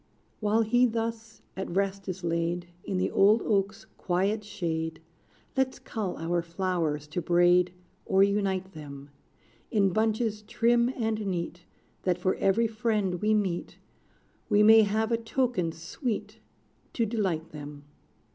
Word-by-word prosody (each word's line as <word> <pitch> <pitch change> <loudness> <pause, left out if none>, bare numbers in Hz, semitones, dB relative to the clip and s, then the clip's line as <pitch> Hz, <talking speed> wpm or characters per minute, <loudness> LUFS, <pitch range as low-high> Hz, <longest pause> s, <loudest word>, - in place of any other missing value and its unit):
While 215 +1 +2
he 245 +3 +4
thus 225 -1 -4
at 190 - -4
rest 195 +1 -1
is 185 0 -5
laid 170 +1 -1 0.2
In 190 - -2
the 185 - 0
old 210 +3 +5
oak's 205 +1 0
quiet 195 +4 0
shade, 165 -6 -3 0.6
Let's 265 -1 +1
cull 210 -5 -4
our 170 +1 0
flowers 170 -4 -2
to 165 +3 -2
braid, 175 +1 +4 0.4
Or 190 +1 +5
unite 195 -2 0
them 140 -3 -10 0.6
In 195 -4 +2
bunches 220 0 0
trim 235 +2 +2
and 220 -2 -1
neat, 175 -1 -4 0.4
That 180 -2 +1
for 185 +1 +1
every 195 +4 +2
friend 215 -5 -1
we 215 +1 +3
meet, 190 -5 -2 0.7
We 210 -1 +5
may 220 +1 +8
have 220 +2 +1
a 230 - +3
token 230 -7 -1
sweet 185 - -5 0.5
To 230 - +1
delight 190 -8 -2
them. 145 -1 -9
195 Hz, 135 wpm, -28 LUFS, 175-220 Hz, 0.7 s, may